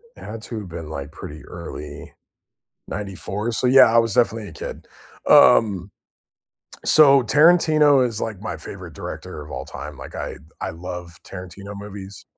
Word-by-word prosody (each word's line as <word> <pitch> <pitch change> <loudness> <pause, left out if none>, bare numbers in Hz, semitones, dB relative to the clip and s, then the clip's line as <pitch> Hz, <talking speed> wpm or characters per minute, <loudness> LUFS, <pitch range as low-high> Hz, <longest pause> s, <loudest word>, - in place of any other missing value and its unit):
It - - -13
had 115 0 -7
to 115 -2 -5
have 95 - -10
been 80 -2 -7
like 75 -1 -6
pretty 75 -1 -9
early, 75 -4 -9 0.7
'94, 100 +2 -4
so 120 +2 +1
yeah, 125 -3 +7
I 115 - +5
was 115 -3 +2
definitely 110 -3 +1
a - - -11
kid. - - -8 0.4
Um, 100 -4 +5 0.9
so 140 -4 +6
Tarantino 150 -1 +5
is 115 -3 -3
like 105 -5 -4
my 110 - -5
favorite - - -9
director - - -7
of 75 - -11
all 65 - -5
time, 70 +1 -8
like - - -10
I - - -5 0.2
I - - -3
love 85 0 -7
Tarantino 100 +2 -9
movies. 100 -1 -9
100 Hz, 160 wpm, -22 LUFS, 85-115 Hz, 0.9 s, yeah